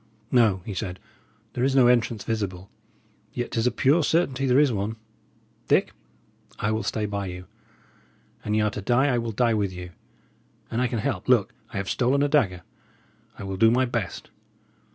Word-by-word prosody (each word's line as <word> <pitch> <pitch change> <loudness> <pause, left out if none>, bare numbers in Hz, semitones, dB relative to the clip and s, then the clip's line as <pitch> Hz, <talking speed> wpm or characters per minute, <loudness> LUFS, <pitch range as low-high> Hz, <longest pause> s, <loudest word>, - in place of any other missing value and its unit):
"No," 110 -7 +3
he 105 - -5
said, 90 0 -4 0.5
"there 125 - -2
is 135 0 +2
no 130 -2 +6
entrance 120 -4 +2
visible. 100 -4 -4 0.6
Yet 120 -1 -3
'tis 115 +1 +1
a - - +2
pure 135 +8 +3
certainty 140 -5 +1
there 125 0 +4
is 145 -3 +4
one. 105 +2 -2 0.7
Dick, - - +2 0.6
I 105 - -1
will 110 0 0
stay 110 -2 -2
by 100 -1 -3
you. 90 0 -7 1.0
An 105 - -1
y' 110 - +3
are 105 - +1
to 105 - -5
die, 125 +7 +2
I 120 - +2
will 115 -1 -3
die 115 +1 +2
with 100 -3 0
you. 90 -1 -8 0.8
And 115 - 0
I 125 - +2
can 120 - -3
help 105 - -2
look! - - +3 0.2
I - - -5
have 100 0 -3
stolen 135 +3 +1
a - - +3
dagger 100 - +1 0.7
I - - -8
will 95 -1 -4
do 115 +3 +6
my 125 +3 +3
best! 115 -7 -4
115 Hz, 190 wpm, -25 LUFS, 100-125 Hz, 1.0 s, no